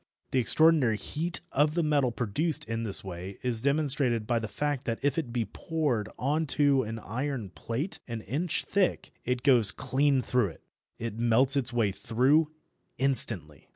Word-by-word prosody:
The 130 - +2
extraordinary 135 -2 +4
heat 170 +9 -4
of 150 +2 +2
the 170 - +1
metal 145 -5 +2
produced 125 +8 -2
in 115 0 -3
this 105 -4 -1
way 95 +1 -7
is 120 -3 -1
demonstrated 135 -5 +1
by 120 +1 0
the 110 - -4
fact 145 +2 -3
that 115 -1 -2
if 145 +2 +1
it 135 -7 -5
be 120 -2 -1
poured 135 - -2
on 150 +4 0
to 140 -2 +4
an 115 -1 -5
iron 120 -2 -4
plate 125 - -4
an 115 -2 -5
inch 150 - -1
thick 195 -2 0
it 125 0 -1
goes 125 -7 +6
clean 135 -1 +1
through 125 -4 +1
it. 80 - -12 0.3
It 115 -1 -5
melts 120 +4 +3
its 130 -3 0
way 115 -4 +1
through 135 +10 +2 0.5
instantly. 105 - +1
125 Hz, 170 wpm, -28 LUFS, 115-145 Hz, 0.5 s, goes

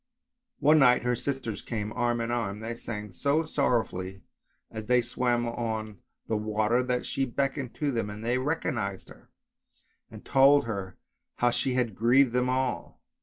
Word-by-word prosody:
One 155 +3 +5
night 125 -3 +5
her 125 0 +1
sisters 130 -3 -4
came 110 -2 -4
arm 120 -1 0
in 115 +1 -2
arm; 105 -4 -2
they 115 +1 -5
sang 105 -4 -6
so 145 - +1
sorrow 140 -6 +2
fully 95 +1 -7 0.5
as 110 -1 -7
they 125 0 +4
swam 120 0 0
on 110 -3 -4 0.3
the 110 - 0
water 110 +3 +1
that 125 -1 -1
she 135 - -1
beckoned 135 0 -2
to 145 -2 -1
them 115 -4 -2
and 105 +2 -7
they 125 +2 +1
recognised 130 - -2
her, - - -16 0.8
and - - -12
told 140 +1 +5
her 100 -4 -5 0.4
how 120 0 +2
she 125 +1 -1
had 120 -4 0
grieved 120 +4 +4
them 125 0 +1
all. 130 -9 -2
120 Hz, 170 wpm, -28 LUFS, 110-130 Hz, 0.8 s, One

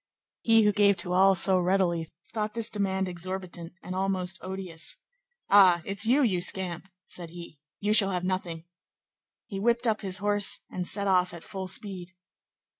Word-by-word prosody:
He 225 -1 +4
who 210 - +4
gave 200 -1 +3
to 175 +1 -3
all 190 +1 +5
so 185 0 +4
readily 175 -3 0 0.3
thought 215 -1 -3
this 230 -1 -1
demand 190 -2 -1
exorbitant 180 -1 -5
and 185 - -6
almost 185 -1 -2
odious. 185 -4 -4 0.5
"Ah! 185 -4 +5
it's 200 +2 -1
you, 275 +5 +4
you 190 -7 +1
scamp?" 180 -1 -1 0.2
said 175 -2 -9
he; 170 -3 -11 0.2
"you 210 +1 0
shall 200 -2 +7
have 180 -2 -3
nothing." 180 -3 -3 0.8
He 195 -3 -6
whipped 235 +3 +1
up 220 -2 0
his 190 -2 -1
horse 205 0 +1
and 180 -1 -4
set 200 -1 -2
off 180 -2 +1
at 170 - -11
full 190 -1 -6
speed. 190 -1 -4
190 Hz, 170 wpm, -27 LUFS, 180-200 Hz, 0.8 s, shall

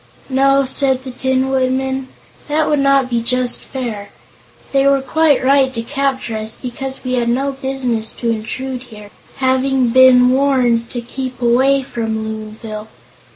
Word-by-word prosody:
"No," 275 +1 +3
said 265 0 0
the 260 - -7
Tin 260 +1 0
Woodman, 265 0 -1 0.4
"that 305 +1 +1
would 295 - +2
not 275 -1 +3
be 235 -2 -1
just 250 +1 0
fair. 225 -6 -6 0.6
They 275 0 +3
were 275 0 +4
quite 300 +1 +2
right 270 -1 +4
to 230 - -3
capture 270 -3 -2
us, 215 +1 -3
because 265 +1 -6
we 255 -1 -3
had 240 -2 +1
no 270 +4 0
business 265 -4 -2
to 235 -1 -2
intrude 250 +4 -4
here, 210 -2 -12 0.2
having 260 -1 +1
been 250 0 +6
warned 255 -4 +2
to 240 - -4
keep 255 +1 -6
away 260 +3 +3
from 225 -3 -3
Loonville. 215 0 -7
260 Hz, 155 wpm, -17 LUFS, 235-270 Hz, 0.6 s, been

